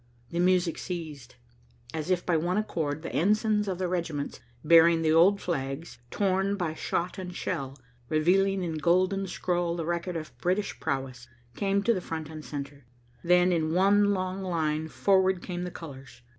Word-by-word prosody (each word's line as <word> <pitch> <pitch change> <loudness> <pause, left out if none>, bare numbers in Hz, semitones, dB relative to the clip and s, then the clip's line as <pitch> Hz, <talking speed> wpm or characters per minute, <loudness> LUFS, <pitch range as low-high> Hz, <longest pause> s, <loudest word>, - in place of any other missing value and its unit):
The 170 - -2
music 180 -1 +2
ceased. 155 -8 -6 0.6
As 160 +2 -4
if 180 -1 +1
by 175 - +2
one 175 +4 0
accord, 155 -8 -2
the - - -5
ensigns 210 +3 +2
of 185 -2 -2
the 185 0 -1
regiments, 165 -5 -3 0.3
bearing 165 0 +6
the 155 - +3
old 185 +5 +5
flags, 135 -5 -4
torn 195 +2 +1
by 175 -5 -2
shot 175 +4 -2
and 180 -1 -6
shell, 135 -4 -3 0.3
revealing 190 +5 +2
in 160 -3 -3
golden 185 +4 +2
scroll 175 -1 -1
the 165 -2 -3
record 170 +1 -2
of 155 -1 -8
British 185 +3 -1
prowess, 135 -4 -3 0.3
came 200 0 0
to 235 - +3
the 185 - -2
front 160 -2 -5
and 155 -1 -8
centre. 140 -3 -7 0.4
Then, 180 +1 +4
in 160 -1 0
one 205 +2 +4
long 185 0 -2
line, 160 -4 -1
forward 190 +1 +2
came 180 -1 -4
the - - -4
colors. 135 -7 -11
175 Hz, 170 wpm, -28 LUFS, 155-185 Hz, 0.6 s, bearing